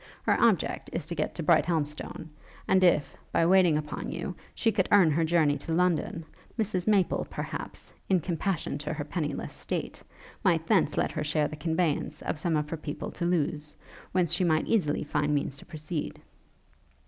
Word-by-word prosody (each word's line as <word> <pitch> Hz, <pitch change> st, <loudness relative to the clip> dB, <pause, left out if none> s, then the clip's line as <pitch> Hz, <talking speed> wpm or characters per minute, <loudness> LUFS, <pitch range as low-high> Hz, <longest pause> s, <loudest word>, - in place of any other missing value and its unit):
Her -, -, +3 dB
object 225 Hz, -6 st, +2 dB
is 165 Hz, -3 st, -3 dB
to 170 Hz, -, -4 dB
get 155 Hz, -2 st, -2 dB
to 170 Hz, -, -3 dB
Brighthelmstone. 155 Hz, -1 st, 0 dB, 0.4 s
And 190 Hz, 0 st, +4 dB
if, 150 Hz, -6 st, +3 dB, 0.2 s
by 165 Hz, -, +3 dB
waiting 180 Hz, -3 st, +5 dB
upon 150 Hz, 0 st, -4 dB
you, -, -, -4 dB, 0.2 s
she 225 Hz, -, +2 dB
could 190 Hz, -3 st, 0 dB
earn 190 Hz, -6 st, +6 dB
her 165 Hz, +3 st, +2 dB
journey 160 Hz, -3 st, +3 dB
to 165 Hz, -, -4 dB
London, 170 Hz, -1 st, +1 dB, 0.3 s
Mrs 205 Hz, -5 st, 0 dB
Maple, 200 Hz, -4 st, +2 dB
perhaps, -, -, -6 dB, 0.2 s
in 190 Hz, -2 st, +4 dB
compassion 175 Hz, 0 st, -2 dB
to 150 Hz, +2 st, -3 dB
her 150 Hz, -1 st, -3 dB
pennyless 150 Hz, -1 st, -3 dB
state, -, -, -4 dB, 0.4 s
might -, -, +3 dB
thence -, -, +2 dB
let -, -, +1 dB
her 155 Hz, -, -2 dB
share 150 Hz, 0 st, +1 dB
the 155 Hz, -, -7 dB
conveyance 160 Hz, 0 st, -1 dB
of 150 Hz, -, -2 dB
some 160 Hz, 0 st, +1 dB
of 150 Hz, 0 st, -1 dB
her 165 Hz, -, -2 dB
people 150 Hz, -1 st, -5 dB
to 170 Hz, -, -3 dB
Lewes, 150 Hz, -3 st, 0 dB, 0.4 s
whence 180 Hz, -3 st, +1 dB
she -, -, +1 dB
might 160 Hz, -2 st, +2 dB
easily 175 Hz, -10 st, +1 dB
find 145 Hz, 0 st, 0 dB
means 140 Hz, -1 st, -1 dB
to -, -, -15 dB
proceed.' 155 Hz, -1 st, -5 dB
160 Hz, 180 wpm, -28 LUFS, 150-180 Hz, 0.4 s, earn